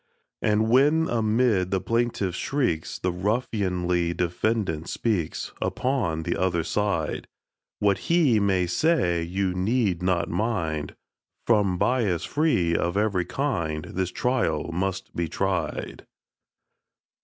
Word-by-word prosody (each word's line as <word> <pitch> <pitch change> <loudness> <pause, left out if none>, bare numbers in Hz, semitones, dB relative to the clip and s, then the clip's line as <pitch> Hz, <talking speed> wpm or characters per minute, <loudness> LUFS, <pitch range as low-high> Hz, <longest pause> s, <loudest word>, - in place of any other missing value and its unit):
And 105 +1 +2
when 145 +7 +4
amid 110 -4 +2
the 95 0 +1
plaintiff's 115 -5 -1
shrieks, 120 - -1
The 90 - -1
ruffianly 90 -4 0
defendant 90 -2 -1
speaks— 100 -9 -2
Upon 115 -12 -1
the 85 - -1
other 85 -3 0
side; 100 -7 -1 0.5
What 100 -2 +2
he 155 -10 +4
may 95 -3 +2
say 90 - +2
you 90 +2 -1
need 95 -1 0
not 90 -1 +1
mind— 85 -7 -2 0.5
From 105 -5 +3
bias 105 -7 +1
free 120 - +1
of 85 +3 0
every 100 -4 +1
kind, 85 - -2
This 95 -1 -1
trial 90 -11 0
must 95 +3 -3
be 85 -1 -1
tried! 95 0 -2
95 Hz, 115 wpm, -25 LUFS, 85-115 Hz, 0.5 s, when